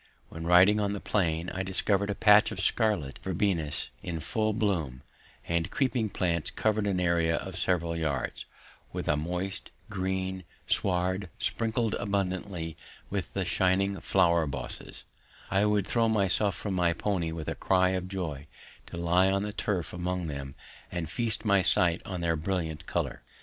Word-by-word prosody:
When, 80 +1 -6
riding 95 +4 +6
on 100 -1 0
the 100 - -3
plain, 85 -4 0
I 95 - -3
discovered 100 +1 +1
a 105 - -1
patch 105 0 +6
of 100 - -5
scarlet 95 - +1
verbenas 90 -5 -1
in 85 -2 -4
full 110 +7 0
bloom, 85 - -1 0.4
the 85 0 +1
creeping 120 - 0
plants 85 -4 -1
covering 110 -1 0
an 95 -2 0
area 85 -2 +2
of - - -5
several 85 -2 0
yards, 75 -6 -2 0.5
with - - -5
a 75 - +3
moist, 90 +5 -3 0.2
green 95 -1 -2 0.2
sward 95 0 +1
sprinkled 115 -1 0
abundantly 95 -4 -2 0.4
with - - -3
the - - 0
shining 95 +1 +1
flower 85 -2 +3
bosses, 65 -2 -6 0.5
I 100 +2 +3
would 105 -2 +2
throw 115 +1 +2
myself 100 -2 +2
from 100 - -4
my 90 -2 +2
pony 85 -2 -1
with 80 -1 -6
a - - -1
cry 95 -1 +2
of 95 -1 -2
joy 80 -7 -5 0.4
to - - -8
lie 90 +2 +3
on 100 +1 +1
the 105 0 -4
turf 100 -5 -2
among 90 0 -2
them 70 -3 -6 0.4
and 85 -3 -4
feast 115 -1 -1
my 100 -2 +4
sight 85 -1 +6
on 90 -2 -4
their 85 -1 +1
brilliant 80 -2 -3
colour. - - -2
95 Hz, 160 wpm, -29 LUFS, 85-100 Hz, 0.5 s, riding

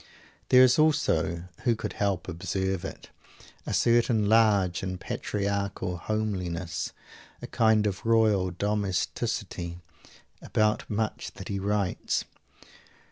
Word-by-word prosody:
There 130 0 +8
is 130 +3 +5
also 85 - +2 0.2
who 120 - +2
could - - -5
help 100 -3 -1
observing 95 +1 -2
it? - - -17 0.6
a - - -2
certain 115 -2 +3
large 100 -6 +3
and 95 -1 -4
patriarchal 100 -3 -2
homeliness 90 -4 -3 0.5
a - - -7
kind 110 -2 +3
of 100 -3 -2
royal 110 -5 +3
domesticity 90 -3 -2 0.6
about 110 0 0
much 110 +1 -2
that 95 - -8
he 100 -1 -2
writes. 100 -1 -1
100 Hz, 110 wpm, -27 LUFS, 90-110 Hz, 0.6 s, There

